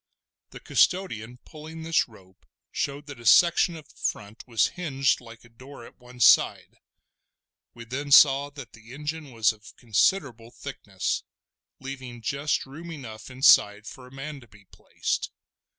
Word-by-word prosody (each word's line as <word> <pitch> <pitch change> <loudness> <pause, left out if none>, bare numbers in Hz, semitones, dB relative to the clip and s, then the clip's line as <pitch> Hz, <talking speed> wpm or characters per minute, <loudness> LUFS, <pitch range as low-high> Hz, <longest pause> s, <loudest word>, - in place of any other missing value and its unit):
The - - -11
custodian 125 - 0
pulling 160 +1 -10
this 165 0 +1
rope 95 -5 -20 0.2
showed 140 +1 -3
that 145 -4 -10
a 120 - -13
section 170 0 +5
of 155 -3 -12
the - - -23
front 105 +3 -4
was 115 -3 +2
hinged 135 -9 0
like 115 -1 -14
a - - -18
door 130 +1 -13
at - - -17
one 125 0 -15
side; - - +4 1.0
we 120 0 -10
then 140 +5 -5
saw 140 0 +7
that 140 -4 -11
the 115 +3 -13
engine 150 +1 -5
was 115 -2 +2
of 110 0 -16
considerable 120 - 0
thickness, - - -4 0.6
leaving 130 -3 -8
just 140 +5 -1
room 155 +6 -10
enough 120 -9 -9
inside 110 -5 +4
for 125 +2 -11
a - - -17
man 140 +2 -7
to 120 - -17
be 105 -1 -20
placed. - - -3
130 Hz, 155 wpm, -26 LUFS, 115-145 Hz, 1.0 s, saw